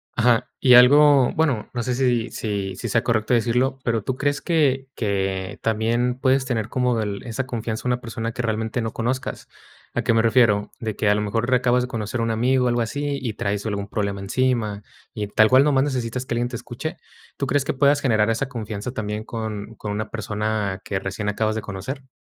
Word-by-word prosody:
Ajá, 120 0 +3
y 130 -2 +5
algo, 140 +2 +7
bueno, 145 -9 0
no 120 -1 -2
sé 125 - -1
si 125 -3 +1
si 100 -3 -3
si 120 - -5
sea 115 +3 +2
correcto 110 0 +1
decirlo, 125 +4 +1
pero, 115 -3 0
¿tú 130 - -2
crees 145 +1 0
que 140 -6 +1
que 95 -3 -2
también 115 +3 0
puedes 130 0 +2
tener 115 -4 -2
como 125 -1 +1
del 105 -2 -3
esa 125 +1 -3
confianza 115 -3 -4
en 125 - -1
una 125 - -3
persona 115 -1 -4
que 120 - -4
realmente 110 +1 -1
no 115 -1 -3
conozcas? 125 +3 -3 0.5
¿A - - 0
qué - - +2
me 115 - +4
refiero? 110 -3 +3
¿De 110 -3 -3
que 105 - -1
a 105 - +4
lo 105 - 0
mejor 115 +3 -1
acabas 125 -1 +3
de - - -3
conocer 115 -1 -4
un 115 0 0
amigo, 125 +3 +2
algo 120 0 +1
así, 145 +4 -2
y 120 -4 -3
traes 100 0 -2
algún 100 -2 -3
problema 100 -1 -2
encima 110 0 0 0.3
y 105 -1 -3
tal 110 +2 +4
cual 130 +1 +6
nomás 140 -2 +3
necesitas 125 -3 -2
que 125 - -3
alguien 120 +1 0
te 125 - -6
escuche? 130 +9 -6 0.4
¿Tú 140 - -1
crees 145 0 +1
que - - -1
puedas 140 +1 +3
generar 110 -5 +2
esa 125 +4 -2
confianza 110 -2 -5
también 105 -2 -4
con 110 -1 -5
con 105 0 -5
una 110 +1 -3
persona 105 -2 -2
que 95 - -2
recién 100 +2 -3
acabas 110 +1 0
de 110 - -2
conocer? 110 +7 -6
115 Hz, 210 wpm, -23 LUFS, 105-130 Hz, 0.5 s, algo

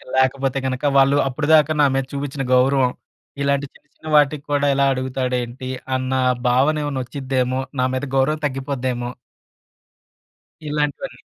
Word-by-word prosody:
లేకపోతే 130 +1 +1
కనుక 130 0 -3
వాళ్ళు 135 +1 +5
అప్పటిదాకా 155 +3 +3
నా - - +6
మీద 135 -1 0
చూపించిన 140 -1 -3
గౌరవం 130 0 +3 0.5
ఇలాంటి 140 0 +1
చిన్న - - -23
చిన్న - - -13
వాటికి 145 0 +2
కూడా 145 0 +2
ఇలా 140 0 +2
అడుగుతాడు 130 0 -2
ఏంటి 130 +2 -7 0.3
అన్న 130 0 -2 0.3
భావన 140 +5 +2
ఏమన్నా 140 -3 -2
వచ్చిద్దేమో! 130 0 -2 0.2
నా - - +3
మీద 130 +2 -2
గౌరవం 155 +4 +1
తగ్గిపోద్దేమో! 130 -2 -3 1.6
ఇలాంటివన్నీ. 150 - -3
135 Hz, 130 wpm, -21 LUFS, 130-145 Hz, 1.6 s, నా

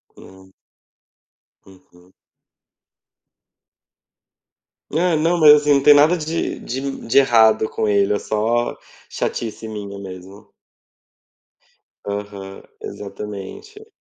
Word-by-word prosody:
Hum. 95 0 -16 1.1
Uhum. 90 -1 -21 2.8
É 170 +1 +1
não 165 +3 +1
mas, 150 -1 +9
assim 150 -1 +3
não 140 - +2
tem 145 - +8
nada 150 +5 +5
de 160 +1 -3
de 135 +2 -5
de 115 - +1
errado 110 -4 +4
com 110 - -2
ele, 100 0 +2
é 105 - -1
só 115 +3 -1 0.3
chatice 115 -1 -4
minha 100 -2 -7
mesmo. 95 +1 -11 1.6
Aham, 100 -1 -7 0.2
exatamente. 105 - -9
110 Hz, 95 wpm, -20 LUFS, 100-145 Hz, 2.8 s, mas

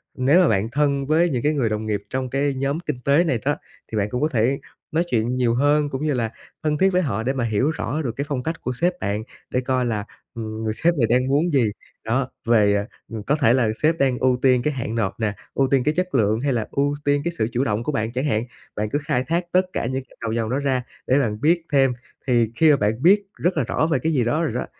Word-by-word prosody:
Nếu 140 +8 +4
mà 180 - +4
bạn 110 -1 +1
thân 140 0 +1
với 160 +4 +3
những 125 -5 -2
cái 150 +1 +2
người 130 -6 +1
đồng 110 0 -2
nghiệp 105 -2 -2
trong 130 -1 -2
cái 140 +1 0
nhóm 140 +4 -1
kinh 150 -7 -4
tế 145 +5 +4
này 130 -9 0
đó, 145 - +2 0.4
thì 110 - -2
bạn 105 0 0
cũng 125 - -3
có 155 - +2
thể 125 +2 +1 0.3
nói 165 +2 +2
chuyện 115 -1 +1
nhiều 125 -2 +1
hơn 145 +2 +2
cũng 135 +2 -4
như 150 - +1
là 115 -3 -1 0.3
thân 150 -1 +1
thiết 190 +5 +4
với 185 -1 +2
họ 110 - -2
để 130 - 0
mà 130 -3 -1
hiểu 115 +6 +1
rõ 155 0 -3
được 125 - -2
cái 140 - -3
phong 140 -4 -2
cách 160 +3 -4
của 125 - -2
sếp 175 +8 +1
bạn 105 - -2 0.3
để 125 - 0
coi 130 -1 0
là, 105 -4 -2 0.3
ừm, 110 -1 -5
người 110 -1 -1
sếp 170 +8 +2
này 115 - +3
đang 125 +3 +2
muốn 150 +4 +1
gì, 120 -6 +3 0.3
đó, 130 +3 0 0.2
về 105 -3 +3 0.3
ừm, 110 -2 -5
có 145 - +1
thể 135 -6 +3
là 125 -4 +2
sếp 160 +2 +3
đang 135 -4 +2
ưu 130 -1 +2
tiên 130 -2 +4
cái 150 +1 0
hạn 115 -3 -4
nộp 105 -3 -1
nè, 110 -2 0 0.2
ưu 135 -1 +2
tiên 135 -2 +3
cái 150 - +2
chất 180 -4 -1
lượng 110 -2 +2
hay 140 +2 0
là 115 -3 -1
ưu 140 +1 +1
tiên 145 0 +2
cái 170 - 0
sự 110 - +1
chủ 125 +3 0
động 105 0 -1
của 150 - -1
bạn 110 -3 -1
chẳng 130 +4 -2
hạn. 110 -6 +1 0.3
Bạn 105 0 -2
cứ 145 - 0
khai 125 -3 0
thác 170 +3 0
tất 185 +1 +3
cả - - -1
những 130 +2 -2
gạch - - -22
đầu 115 - -2
dòng 115 -1 -1
đó 130 - 0
ra 135 -3 0 0.2
để 135 +3 +4
bạn 105 -4 -1
biết 165 +2 +2
thêm. 135 -2 +4 0.4
Thì 120 -3 +2
khi 160 +5 +5
mà - - +6
bạn 110 +3 0
biết 200 +4 +6
rất 175 -1 0
là 140 - +2
rõ 155 +6 0
về - - +2
cái 160 0 0
gì 125 -4 +2
đó 150 +8 0
rồi 150 - -1
đó, 125 - -2
130 Hz, 280 wpm, -22 LUFS, 115-150 Hz, 0.4 s, mà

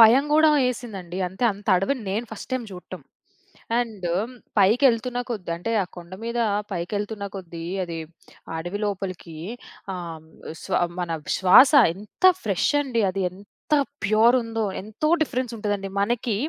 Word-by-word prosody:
భయం 235 +5 +8
గూడా 310 +1 +6 0.2
యేసిందండి. 195 -8 -5
అంటే 190 +7 -3
అంత 200 +1 -14
అడవిని 230 +8 0
నేను 220 +5 -2
ఫస్ట్ 220 - -9
టైమ్ 255 -2 -1
చూడటం. 180 -1 -9 0.8
అండు 210 -7 -2 0.5
పైకెళ్తున్న 240 +4 +3
కొద్ది 200 -7 -4
అంటే 180 +7 -4
ఆ - - -2
కొండ 175 +1 -11
మీద 235 +1 -2 0.3
పైకెళ్తున్న 205 +4 -3
కొద్దీ 170 -3 -7 0.2
అది 170 -1 -5 0.6
అడవి 175 +5 -4
లోపలికి 185 -4 -4 0.6
ఆహ్, 170 -3 -6
హ్మ్. 160 0 -20 0.3
స్వ - - -3 0.3
మన 175 -1 -3 0.3
శ్వాస 190 +10 +7 0.2
ఎంత 210 - -12 0.2
ఫ్రెష్ 195 -5 +1
అండి 245 -5 0
అది 195 +1 -2
ఎంత 190 +3 -14 0.6
ప్యూరుందో 225 +2 +3 0.2
ఎంతో 215 +9 -2
డిఫరెన్స్ 255 -5 -2
ఉంటదండి. 205 -2 -2
మనకి 230 +1 0
205 Hz, 135 wpm, -24 LUFS, 185-235 Hz, 0.8 s, భయం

